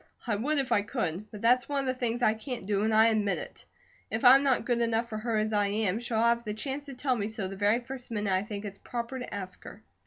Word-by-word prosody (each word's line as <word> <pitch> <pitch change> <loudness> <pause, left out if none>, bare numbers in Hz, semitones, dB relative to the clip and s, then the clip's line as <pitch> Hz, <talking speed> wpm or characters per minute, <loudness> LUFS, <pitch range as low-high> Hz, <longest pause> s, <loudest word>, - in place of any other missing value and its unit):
I 225 -4 0
would 285 +9 0
if 270 -3 -1
I 205 - +4
could, 200 0 -3
but 210 0 -10
that's 250 +3 +3
one 285 -1 0
of - - -4
the 255 - +1
things 245 -1 -2
I 215 - +5
can't 230 -1 -6
do, 200 0 0
and 220 +1 +1
I 220 +1 +6
admit 210 -3 +1
it. - - -9 0.4
If 220 +3 -2
I'm 265 +2 +9
not 270 -3 +2
good 240 -1 +1
enough 230 0 +1
for 215 -2 -5
her 225 0 -1
as 215 +1 0
I 205 -1 +2
am, 205 0 0
she'll 235 -1 -2
have 235 +1 +3
the 210 -2 -4
chance 275 +5 -4
to 275 - -7
tell 255 0 0
me 205 -3 -2
so 215 -3 -4
the 195 - -7
very 205 +4 +2
first 250 +1 -8
minute 210 -4 -1
I 185 - +2
think 205 0 -6
it's 200 -1 -7
proper 240 +2 -5
to 250 - -7
ask 190 -2 -6
her." - - -11
225 Hz, 280 wpm, -29 LUFS, 210-245 Hz, 0.4 s, I'm